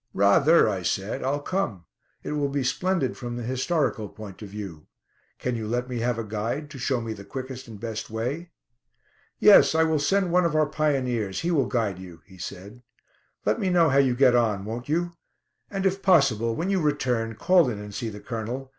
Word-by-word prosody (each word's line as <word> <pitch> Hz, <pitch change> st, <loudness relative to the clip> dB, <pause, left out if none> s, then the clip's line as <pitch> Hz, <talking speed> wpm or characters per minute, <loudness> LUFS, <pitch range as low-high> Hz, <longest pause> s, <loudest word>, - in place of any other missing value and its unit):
"Rather," 110 Hz, -, +5 dB
I 100 Hz, -3 st, -1 dB
said; 95 Hz, +3 st, -2 dB
"I'll 140 Hz, +2 st, -1 dB
come. 120 Hz, -, -2 dB, 0.4 s
It -, -, -4 dB
will 145 Hz, -1 st, 0 dB
be 140 Hz, -1 st, -1 dB
splendid 180 Hz, +1 st, 0 dB
from 120 Hz, -1 st, -6 dB
the 120 Hz, -, -4 dB
historical 130 Hz, -, -1 dB
point 105 Hz, -2 st, -11 dB
of 105 Hz, -, -8 dB
view. 95 Hz, -7 st, -8 dB, 0.5 s
Can 125 Hz, -1 st, -2 dB
you 110 Hz, -2 st, -4 dB
let 120 Hz, +2 st, -1 dB
me 125 Hz, -2 st, -4 dB
have 120 Hz, 0 st, 0 dB
a 115 Hz, -, -2 dB
guide, 115 Hz, +8 st, -3 dB
to 135 Hz, -, -9 dB
show 125 Hz, 0 st, 0 dB
me 115 Hz, -1 st, -4 dB
the 100 Hz, -2 st, -10 dB
quickest 130 Hz, +4 st, -7 dB
and 110 Hz, -3 st, -10 dB
best 115 Hz, 0 st, -5 dB
way?" 125 Hz, +10 st, -3 dB, 0.9 s
"Yes, -, -, +7 dB
I 160 Hz, -, +5 dB
will 160 Hz, -1 st, +1 dB
send 185 Hz, +5 st, +1 dB
one 180 Hz, +1 st, +4 dB
of 165 Hz, -2 st, 0 dB
our 155 Hz, 0 st, +4 dB
pioneers; 130 Hz, -10 st, -1 dB
he 175 Hz, -, 0 dB
will 140 Hz, -7 st, +2 dB
guide 110 Hz, -8 st, -1 dB
you," 90 Hz, -3 st, -11 dB
he 95 Hz, -2 st, -17 dB
said. 100 Hz, +6 st, -8 dB, 0.6 s
"Let -, -, +1 dB
me 195 Hz, -4 st, 0 dB
know 170 Hz, -3 st, +4 dB
how 135 Hz, 0 st, +4 dB
you 130 Hz, -3 st, +3 dB
get 130 Hz, -1 st, +5 dB
on, 105 Hz, -5 st, +1 dB
won't 120 Hz, +5 st, -6 dB
you? 170 Hz, +2 st, -1 dB, 0.5 s
And, 195 Hz, -1 st, -3 dB
if 195 Hz, +1 st, +1 dB
possible, 125 Hz, -, +3 dB
when 180 Hz, +8 st, -1 dB
you 190 Hz, -2 st, +1 dB
return 125 Hz, -7 st, 0 dB
call 175 Hz, +4 st, +4 dB
in 110 Hz, -, -4 dB
and 105 Hz, 0 st, -8 dB
see 115 Hz, +2 st, -3 dB
the 105 Hz, -1 st, -9 dB
Colonel. 120 Hz, +4 st, -5 dB
125 Hz, 210 wpm, -25 LUFS, 110-150 Hz, 0.9 s, Yes